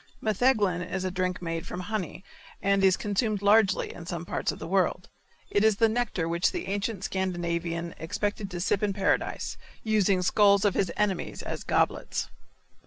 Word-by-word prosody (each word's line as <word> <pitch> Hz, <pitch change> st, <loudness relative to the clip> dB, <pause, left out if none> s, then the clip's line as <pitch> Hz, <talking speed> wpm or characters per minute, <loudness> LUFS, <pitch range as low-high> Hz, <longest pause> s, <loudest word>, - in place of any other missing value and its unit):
Metheglin 215 Hz, -5 st, +2 dB
is 185 Hz, +1 st, -3 dB
a 185 Hz, -, -1 dB
drink 185 Hz, 0 st, -2 dB
made 165 Hz, -1 st, -3 dB
from 180 Hz, -, -5 dB
honey, 190 Hz, -3 st, -4 dB, 0.4 s
and 200 Hz, 0 st, +2 dB
is 190 Hz, -1 st, +5 dB
consumed 210 Hz, 0 st, -1 dB
largely 205 Hz, -1 st, +4 dB
in 170 Hz, -1 st, -10 dB
some 170 Hz, -1 st, -4 dB
parts -, -, -1 dB
of -, -, -8 dB
the -, -, -7 dB
world. 180 Hz, 0 st, 0 dB, 0.4 s
It 205 Hz, -, +3 dB
is 220 Hz, -1 st, +5 dB
the 225 Hz, +2 st, +4 dB
nectar 220 Hz, -7 st, -1 dB
which 170 Hz, +1 st, +1 dB
the -, -, -4 dB
ancient 200 Hz, 0 st, -2 dB
Scandinavian 170 Hz, -3 st, -2 dB
expected 205 Hz, +4 st, -2 dB
to 180 Hz, -2 st, -5 dB
sip 190 Hz, +2 st, +1 dB
in 205 Hz, -2 st, +1 dB
paradise, 195 Hz, 0 st, -1 dB, 0.3 s
using 200 Hz, -4 st, +2 dB
skulls 200 Hz, +1 st, +4 dB
of 200 Hz, -, +3 dB
his 185 Hz, -4 st, 0 dB
enemies 205 Hz, -4 st, -1 dB
as -, -, -5 dB
goblets. -, -, 0 dB
195 Hz, 175 wpm, -27 LUFS, 175-205 Hz, 0.4 s, is